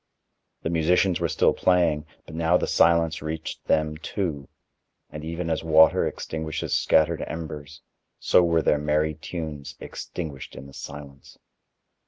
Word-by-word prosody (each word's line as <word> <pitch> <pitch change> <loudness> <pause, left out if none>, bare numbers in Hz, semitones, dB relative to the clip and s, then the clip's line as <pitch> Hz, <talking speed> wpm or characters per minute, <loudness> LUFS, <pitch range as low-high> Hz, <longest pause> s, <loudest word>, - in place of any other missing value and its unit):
The 80 - -1
musicians 85 +2 +2
were - - +1
still - - +3
playing, 85 -4 +2 0.2
but - - -12
now 85 +2 +3
the - - -1
silence 85 -1 +3
reached 80 +1 -5
them 75 0 +1
too, 80 -6 -4 0.6
and 75 0 -7
even 85 +2 -4
as 80 -1 -1
water 80 0 +5
extinguishes 80 -1 -4
scattered 80 +1 +3
embers, 75 -2 -7 0.3
so - - +4
were 85 -1 +2
their 75 - +3
merry 75 +1 +1
tunes 75 -3 -6
extinguished 75 -6 -7
in 65 - -9
the 70 - -13
silence. 70 -1 -10
80 Hz, 140 wpm, -25 LUFS, 75-85 Hz, 0.6 s, water